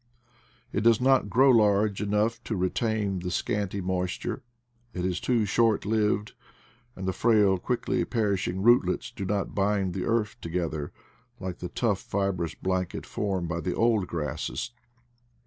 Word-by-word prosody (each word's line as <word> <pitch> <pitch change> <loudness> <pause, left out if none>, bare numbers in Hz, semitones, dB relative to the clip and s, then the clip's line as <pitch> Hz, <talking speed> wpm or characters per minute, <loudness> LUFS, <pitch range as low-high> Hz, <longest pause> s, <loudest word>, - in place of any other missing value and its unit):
It 100 - 0
does 115 0 +5
not 130 -4 +3
grow 130 +6 +5
large 105 -3 +3
enough 105 +3 0
to 110 - -2
retain 100 +1 0
the 90 +1 -4
scanty 100 +2 -2
moisture, 90 +6 -2 0.5
it 90 0 -2
is 90 -2 -1
too 120 -4 +1
short 115 +1 +2
lived, 105 -1 0 0.6
and 95 0 -5
the 95 - 0
frail 105 -5 +3
quickly 120 +6 -1
perishing 100 -5 -1
rootlets 120 -6 +3
do 100 - -5
not 100 +1 -1
bind 100 -2 +1
the 95 - -3
earth 115 0 0
together, 80 -3 -3 0.5
like 95 -3 -5
the 90 - -5
tough 105 -6 0
fibrous 95 -4 -2
blanket 95 -1 -2
formed 95 -4 -2
by 85 +1 -2
the 90 +1 -2
old 115 -5 +2
grasses. 80 - -3
100 Hz, 145 wpm, -27 LUFS, 90-110 Hz, 0.6 s, does